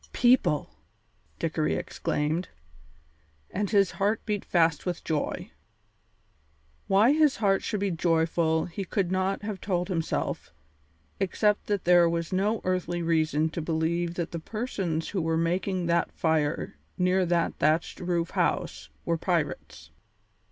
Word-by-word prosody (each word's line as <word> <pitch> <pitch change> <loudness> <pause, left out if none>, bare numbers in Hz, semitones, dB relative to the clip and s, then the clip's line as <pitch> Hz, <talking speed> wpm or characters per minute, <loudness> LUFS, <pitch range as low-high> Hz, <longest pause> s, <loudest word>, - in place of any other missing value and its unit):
"People!" 240 - +3 0.7
Dickory 155 -2 0
exclaimed, 155 +4 -2 1.0
and 205 +1 -1
his 200 -3 +3
heart 205 +3 0
beat 210 -2 -2
fast 165 -4 +2
with 180 -2 -3
joy. 175 +5 -2 1.4
Why 205 +6 +5
his 305 -2 +4
heart 195 -3 +2
should 210 - -3
be 200 -1 0
joyful 160 -1 +1
he 180 +3 -5
could 185 -1 -1
not 190 +2 0
have 205 -3 -5
told 180 -1 -1
himself 165 -4 -2 0.7
except 205 +2 +1
that 205 -2 -1
there 175 -1 +5
was 170 +1 -2
no 205 +4 +1
earthly 175 -2 -1
reason 160 -1 +1
to 165 - -4
believe 165 +2 -1
that 170 -2 -3
the 170 - -4
persons 190 -5 -3
who 190 - -1
were 160 0 0
making 180 +2 0
that 170 0 +1
fire 160 -2 -1 0.2
near 185 +1 +2
that 175 -1 0
thatched 155 +3 +1
roof 175 -2 -1
house 75 - -1 0.2
were 165 -1 0
pirates. 165 -5 -2
175 Hz, 135 wpm, -27 LUFS, 165-195 Hz, 1.4 s, Why